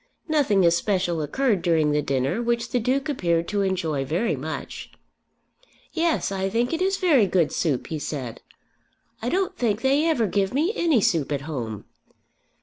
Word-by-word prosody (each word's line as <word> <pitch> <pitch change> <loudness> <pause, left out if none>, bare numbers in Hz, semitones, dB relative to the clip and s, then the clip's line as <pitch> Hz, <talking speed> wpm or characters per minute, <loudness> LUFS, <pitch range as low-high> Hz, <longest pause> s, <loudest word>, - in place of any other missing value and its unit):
Nothing 265 - +3
especial 175 -1 +1
occurred 210 - 0
during 160 -3 +2
the 150 0 +1
dinner, 135 - -1
which 235 0 -1
the 250 - +1
Duke 260 +5 0
appeared 170 - 0
to 205 -1 0
enjoy 170 -7 -1
very 160 - 0
much. 155 +4 -6 1.0
"Yes; 330 - 0
I 195 0 -1
think 235 +6 0
it 330 - -1
is 385 +1 +1
very 290 - +4
good 175 -5 +2
soup," 145 -7 -1
he 160 - -4
said. 130 -6 -5 0.8
"I 235 - -1
don't 380 +4 0
think 225 -2 0
they 280 +4 +3
ever 260 -9 +2
give 200 +2 0
me 325 +9 +1
any 320 - +2
soup 165 - +1
at 140 -1 -1
home." 120 -8 -5
195 Hz, 165 wpm, -24 LUFS, 160-260 Hz, 1.0 s, very